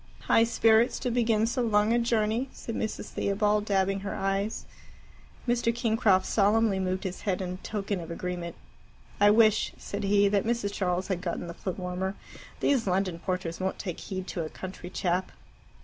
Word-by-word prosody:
"High 225 - +4
spirits 225 0 +4
to 250 - -2
begin 225 -2 +2
so 240 +3 -1
long 215 -1 +3
a 240 - +3
journey," 230 +2 +1
said 230 - -7
Mrs. 220 0 -3
Theobald, 210 +1 +1
dabbing 195 -1 +1
her 195 0 -4
eyes. 195 +2 -1 0.8
Mr. 240 -1 +2
Kingcroft 220 -5 +2
solemnly 210 -1 +3
moved 185 +1 -1
his 190 -2 -5
head 190 -3 -1
in 185 -1 -4
token 200 -2 -3
of 170 - -8
agreement. 175 0 -4 0.6
"I 205 - +6
wish," 215 0 +4
said 200 - -5
he, 200 0 +4
"that 200 -1 +2
Mrs. 225 -3 -1
Charles 185 -1 -1
had 185 -2 -1
gotten 175 0 -3
the 170 - -6
footwarmer. 185 +1 -3 0.5
These 260 -7 +2
London 185 -2 0
porters 180 -2 -3
won't 190 0 -2
take 180 -5 -5
heed 185 -2 -5
to 170 - -3
a 155 - -5
country 185 0 -8
chap." 180 0 -1
200 Hz, 170 wpm, -28 LUFS, 185-220 Hz, 0.8 s, I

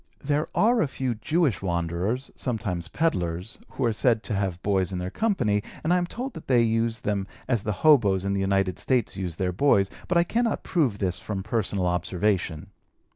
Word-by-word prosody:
There 145 +1 0
are 235 +2 +4
a - - +2
few 130 -2 -2
Jewish 145 - 0
wanderers 90 +8 -2
(sometimes 100 -9 -3
peddlers) 90 - -1
who 130 - -1
are 115 - +2
said 115 0 +2
to - - -3
have 95 -3 -1
boys 95 -3 +1
in 95 - -3
their 90 +1 -4
company, 120 - +1 0.2
and 165 +3 +2
I 180 - +4
am 175 - -2
told 250 +7 -5
that 160 - -10
they 125 -3 +4
use 115 0 0
them 100 -2 -1 0.2
as 120 -5 +1
the 105 - -2
hoboes 105 -11 +5
in 100 - 0
the 100 - 0
United 95 -1 +1
States 125 -7 0
use 90 -4 -4
their 90 0 -1
boys, 100 -4 +3 0.2
but 175 - +2
I 170 - +5
cannot 230 +5 0
prove 140 - +1
this 90 -4 -1
from 100 -3 -4
personal 100 -3 -1
observation. 90 -1 -1
105 Hz, 195 wpm, -26 LUFS, 95-135 Hz, 0.2 s, hoboes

